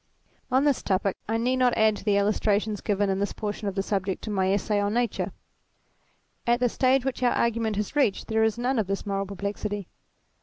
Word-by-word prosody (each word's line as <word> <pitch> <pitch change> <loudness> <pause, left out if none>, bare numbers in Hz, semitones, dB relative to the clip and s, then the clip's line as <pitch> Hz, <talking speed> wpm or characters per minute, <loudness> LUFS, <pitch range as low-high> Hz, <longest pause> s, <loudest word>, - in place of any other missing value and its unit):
On 260 +1 +3
this 290 -3 +2
topic 195 0 0
I 225 - +1
need 250 +3 +1
not 250 -1 +3
add 220 -1 +4
to - - -10
the 205 -1 +2
illustrations 210 0 +1
given 205 -1 +1
of 190 - -1
this 200 - -1
portion 210 -1 -4
of 195 - -3
the 195 - 0
subject 195 -2 -2
in 215 - -3
my 190 -1 +1
Essay 205 +1 +1
on 205 +2 0
Nature. 240 -3 0 1.2
At 240 0 +3
the 250 -1 +2
stage 260 +2 +2
which 265 -1 -2
our 245 -1 +3
argument 230 -2 0
has 210 +6 -3
reached 270 -9 +2
there 220 0 +2
is 220 0 +1
none 245 +1 0
of 210 - 0
this 195 +2 -3
moral 195 -1 -2
perplexity. 200 0 -4
210 Hz, 215 wpm, -26 LUFS, 200-235 Hz, 1.2 s, add